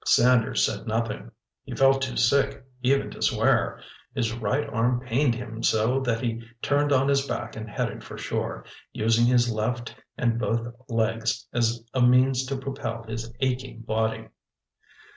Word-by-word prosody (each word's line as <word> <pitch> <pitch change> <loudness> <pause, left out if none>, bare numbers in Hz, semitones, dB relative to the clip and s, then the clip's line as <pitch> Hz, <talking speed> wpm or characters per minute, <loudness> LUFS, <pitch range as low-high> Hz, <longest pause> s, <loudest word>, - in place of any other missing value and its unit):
Sanders 120 -1 +4
said - - -4
nothing. 115 - -2 0.3
He - - -7
felt 135 0 +4
too 130 -2 -2
sick 130 +2 +2 0.2
even 135 +2 +2
to - - -11
swear. - - +2 0.4
His 115 -4 0
right 120 +5 -1
arm 120 +2 +1
pained 125 0 +1
him 115 -2 -6
so 115 +5 +2
that 120 -4 -1
he 115 -2 -2 0.2
turned 145 +3 +1
on 135 0 +4
his 140 0 +2
back - - -4
and 110 0 -6
headed - - -3
for - - -9
shore, - - -3 0.3
using 115 +2 +3
his 120 -1 +3
left 120 +2 -2 0.2
and 115 -1 +1
both 115 +1 -1 0.2
legs 115 0 0
as 115 -1 +1
a 130 - +1
means 125 +1 +4
to 135 0 -2
propel 135 -4 -5
his 115 0 -6
aching 130 -2 -2
body. 110 0 -1
120 Hz, 160 wpm, -26 LUFS, 115-130 Hz, 0.4 s, Sanders